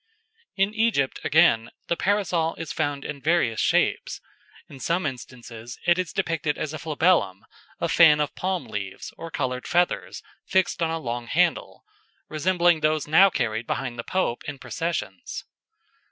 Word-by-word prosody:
In 195 +2 +1
Egypt 220 -12 +1
again, 145 -8 +4 0.2
the 170 - +1
Parasol 180 -5 0
is 165 -3 -6
found 145 -3 -2
in 145 -2 -6
various 150 -7 +1
shapes. - - +1 0.5
In 135 - -12
some 170 +5 0
instances 120 -3 -7
it 175 +1 +4
is 185 - -2
depicted 165 -5 -1
as 155 - -4
a 155 - -5
flabellum, 155 - +1 0.3
a - - 0
fan 155 -3 +6
of 150 - -1
palm 185 -1 -2
leaves 100 -2 -6
or 165 - -8
coloured 130 -4 -3
feathers 175 0 0 0.2
fixed 190 -2 +1
on 165 - +2
a 165 - -1
long 120 -5 -4
handle, - - 0 0.5
resembling 175 +1 +2
those 155 -1 +1
now 185 +6 +6
carried 115 - -2
behind 120 -3 -3
the - - -3
Pope 185 -9 -1
in 145 -1 -5
processions. 135 - -4
155 Hz, 155 wpm, -25 LUFS, 125-175 Hz, 0.5 s, fan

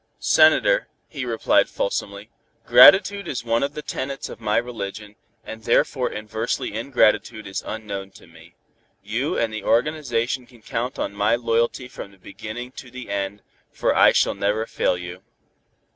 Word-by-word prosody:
"Senator," - - +4 0.2
he - - -6
replied - - +2
fulsomely, - - -4 0.3
"gratitude 200 +1 +7
is 125 -3 -4
one 115 0 +1
of 140 +1 -2
the 150 - -6
tenets 135 +1 -5
of - - -10
my 105 -1 +1
religion, 105 -3 -5 0.3
and 110 0 -9
therefore 125 +3 +1
inversely 110 +1 -3
ingratitude 110 -2 +1
is 95 - -4
unknown 100 -3 -5
to 95 - -17
me. 85 0 -18 0.5
You - - -2
and 115 -2 0
the 110 - -5
organization 125 -2 0
can 120 -4 -20
count 120 +2 -3
on - - -3
my 105 +3 +2
loyalty 115 +1 0
from 125 - -9
the 100 - -21
beginning 110 +6 -8
to 130 - -9
the 125 -4 -9
end, 100 0 -3 0.3
for - - 0
I - - +7
shall - - +2
never 105 +2 -1
fail 90 - 0
you. 90 +1 -8
115 Hz, 160 wpm, -23 LUFS, 105-125 Hz, 0.5 s, gratitude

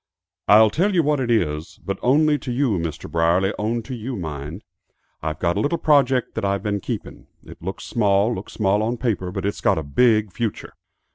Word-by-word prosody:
"I'll 110 +1 +7
tell 190 - +1
you 170 - +4
what 150 -1 +1
it 125 -2 -2
is 80 -9 -1
but 100 -1 -3
only 150 +3 +3
to 125 - -5
you 120 -6 +1
Mr. 80 -3 -5
Brierly, 85 +4 +2
only 115 +2 -1
to 130 - -7
you, 125 +2 -5
mind; 80 -1 -6 0.6
I've 80 0 -3
got 85 0 0
a - - +1
little 150 +4 0
project 135 -5 +2
that 110 - -4
I've 100 -1 0
been 100 -1 -1
keeping. - - -6 0.2
It - - -13
looks 95 +3 -5
small, 105 0 +2
looks - - -7
small 105 -1 +1
on 115 +3 -1
paper, 105 -7 -1
but 95 0 -4
it's 100 - -2
got - - +2
a 80 - -2
big 110 - +2
future. 115 -3 -4
105 Hz, 205 wpm, -22 LUFS, 90-125 Hz, 0.6 s, I'll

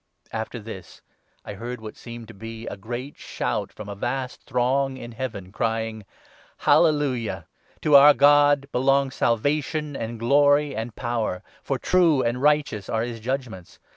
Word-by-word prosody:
After 110 +2 -4
this, 105 -5 -10 0.4
I 105 - -6
heard 120 +4 -6
what 110 -1 -9
seemed 115 -1 -10
to - - -10
be 115 +2 -8
a - - -5
great 120 +7 -7
shout - - -3
from 105 - -10
a - - -6
i - - -4
vast 125 +5 -4
throng 130 +2 +1
in 120 -2 -8
Heaven, 110 -6 -6
crying 110 -1 -2 0.2
— - - -27
' - - -32
Hallelujah! 145 -8 +2 0.4
To 150 -2 +4
our 145 +1 +9
God 145 0 +5
belong 135 +1 +2
Salvation, 145 +5 0
and 115 -2 -4
Glory, 145 +4 +3
and 110 +1 -5
Power, 115 -6 -2 0.2
for - - -2
true 170 -7 +3
and 120 +2 -1
righteous 145 -9 +1
are 110 0 0
his 120 -1 -5
2 - - -19
judgements. 125 -9 -4
120 Hz, 170 wpm, -24 LUFS, 110-140 Hz, 0.4 s, our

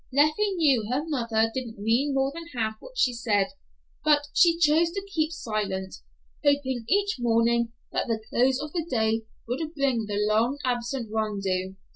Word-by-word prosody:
Leffie 305 +9 +2
knew 270 - +2
her 260 +4 0
mother 230 -6 +1
didn't 240 -4 -5
mean 235 +7 +1
more 270 0 +1
than 335 +1 -8
half 220 -2 0
what - - -13
she 250 - +3
said, 210 -5 +1 0.5
but 295 -1 +3
she 335 -1 +5
chose 330 +1 +4
to 395 0 -4
keep 315 -1 +1
silent, 205 - -3 0.5
hoping 265 -4 +1
each 405 +2 +2
morning 235 0 +2 0.2
that - - -1
the 225 -2 0
close 255 +2 +3
of 300 0 -6
the 340 - -1
day 225 -2 +1 0.2
would 305 +7 -3
bring 260 -6 0
the 205 -1 -2
long 230 +6 +2
absent 245 0 -2
Rondeau. 195 -4 -1
245 Hz, 165 wpm, -26 LUFS, 220-300 Hz, 0.5 s, she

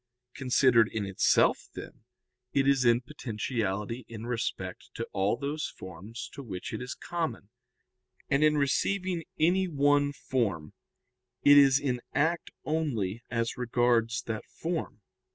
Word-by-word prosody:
Considered 125 -4 +4
in 110 -2 -2
itself, 95 -1 +2
then, - - -10 0.5
it 135 -1 +2
is 135 -2 +3
in 120 0 +5
potentiality 115 -4 -3
in 115 -1 -7
respect 120 -2 -4
to - - -3
all 100 +4 +1
those 145 +2 -3
forms 95 +6 -8
to 140 - -7
which 100 -8 -6
it - - -4
is 125 0 -5
common, 165 -11 -4 0.8
and 140 +1 +2
in 150 0 +4
receiving 180 +5 0 0.2
any 185 +4 +3
one 145 -2 +3
form 105 - -2 0.7
it 145 - +8
is 140 -1 +7
in 125 -4 -1
act 165 +3 +1 0.2
only 120 -10 -1
as 115 -1 -1
regards 120 -2 +1
that 110 -2 -4
form. 165 -10 -4
125 Hz, 135 wpm, -29 LUFS, 115-145 Hz, 0.8 s, it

